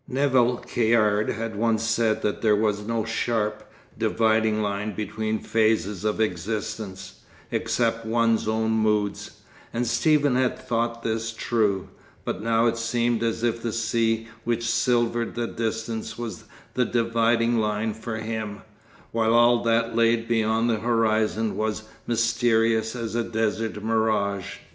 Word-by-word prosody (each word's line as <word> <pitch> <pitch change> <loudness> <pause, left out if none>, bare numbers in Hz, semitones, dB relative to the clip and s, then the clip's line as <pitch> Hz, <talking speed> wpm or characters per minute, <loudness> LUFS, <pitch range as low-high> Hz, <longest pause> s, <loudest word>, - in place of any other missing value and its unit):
Nevill 130 -2 +2
Caird 110 -3 +2
had 110 0 -3
once 115 +1 +1
said 115 -1 +1
that 105 - -1
there 110 -2 +4
was 105 -1 0
no 115 -1 -1
sharp, 110 -2 -1 0.3
dividing 110 -1 +2
line 105 +1 -2
between 110 +1 -2
phases 110 -3 0
of 105 0 -1
existence, 100 -1 -3 0.3
except 115 -1 0
one's 115 -1 +1
own 110 0 +1
moods, 105 -2 0 0.3
and 120 +1 -1
Stephen 145 0 +2
had 130 -1 +1
thought 115 0 -2
this 115 0 -2
true; 110 -4 0 0.4
but - - -3
now 115 +1 +2
it 115 -1 +1
seemed 115 0 0
as 115 0 -1
if 115 -1 0
the 115 - -2
sea 115 0 0 0.2
which 120 0 -1
silvered 120 0 +1
the 120 - -1
distance 115 0 -4
was 120 -2 -6 0.3
the 125 - +1
dividing 115 0 +2
line 105 0 0
for 110 +1 -5
him, 110 -2 -5 0.5
while 115 0 +2
all 120 0 +5
that 115 0 +1
lay 115 0 +4
beyond 115 0 0
the 115 -2 +1
horizon 110 -1 +1
was 110 0 -2 0.2
mysterious 115 -1 +2
as 115 -2 -4
a 120 0 0
desert 110 -1 -2
mirage. 110 -3 0
115 Hz, 140 wpm, -25 LUFS, 110-115 Hz, 0.5 s, all